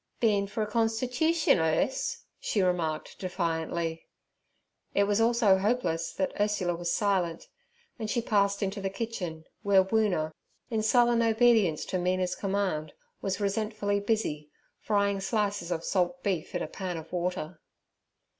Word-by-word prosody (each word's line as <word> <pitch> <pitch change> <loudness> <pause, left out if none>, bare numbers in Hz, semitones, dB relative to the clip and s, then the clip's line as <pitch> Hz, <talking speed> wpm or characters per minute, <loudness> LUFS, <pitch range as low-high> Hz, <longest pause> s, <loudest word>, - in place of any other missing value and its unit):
'Been 205 -4 +2
for 210 +2 -2
a - - -3
constitootion, 250 - +2
Urse?' 160 - 0 0.2
she 210 - -1
remarked 165 -4 -1
defiantly. 165 -2 -2 0.9
It 200 - +5
was 205 +2 +2
all 235 +1 +3
so 205 -5 +4
hopeless 190 -6 0
that 190 - -1
Ursula 205 -4 +1
was 170 0 -2
silent, 185 -6 0 0.5
and 220 -2 -3
she 235 - +1
passed 200 -3 +1
into 200 +1 -2
the 195 - -1
kitchen, 190 -7 -5 0.2
where 195 -2 +5
Woona, 190 -6 +1 0.4
in 220 -1 +1
sullen 235 +1 +4
obedience 225 -7 +3
to 185 - -2
Mina's 180 0 0
command, 190 -6 -2 0.3
was 190 0 -2
resentfully 205 0 0
busy, 200 -8 -1 0.3
frying 200 -2 +1
slices 200 -3 -1
of 165 -2 -2
salt 190 +8 0
beef 185 -6 -2
in - - -1
a - - -4
pan 185 -3 -4
of 160 +2 -10
water. 175 -2 -3
200 Hz, 145 wpm, -29 LUFS, 175-220 Hz, 0.9 s, It